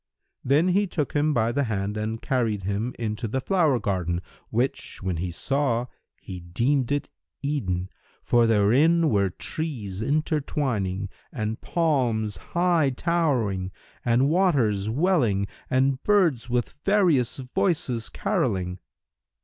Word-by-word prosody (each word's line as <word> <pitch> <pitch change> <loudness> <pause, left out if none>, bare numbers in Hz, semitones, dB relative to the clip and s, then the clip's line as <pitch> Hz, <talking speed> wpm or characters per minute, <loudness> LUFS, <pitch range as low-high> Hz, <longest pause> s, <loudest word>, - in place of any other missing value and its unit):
Then 150 +7 +3
he 200 +3 +2
took 155 -5 -2
him 150 +1 +2
by 115 -4 +1
the 140 +3 0
hand 105 -2 -2
and 110 +1 -3
carried 115 -6 0
him 100 +6 -2
into 110 0 -3
the 130 +5 -1
flower 155 -4 +2
garden 90 -4 -1 0.3
which, 135 +5 -2
when 95 -3 -1
he 90 +2 -2
saw, 125 - 0 0.3
he 90 -1 -8
deemed 120 +10 0
it 145 0 0 0.4
Eden, 95 -11 -1 0.4
for 120 -1 +3
therein 135 +11 +4
were 100 -2 +2
trees 105 - -5
intertwining 130 - -1 0.2
and 110 -4 -3
palms 125 - 0 0.2
high 170 -5 +3
towering 125 - 0 0.3
and 120 +3 +3
waters 135 - +2
welling 125 - +2 0.2
and 130 +1 +2
birds 170 - +2
with 120 +3 -2
various 175 - +3
voices 135 - -1
carolling. 105 - -1
125 Hz, 125 wpm, -25 LUFS, 105-150 Hz, 0.4 s, therein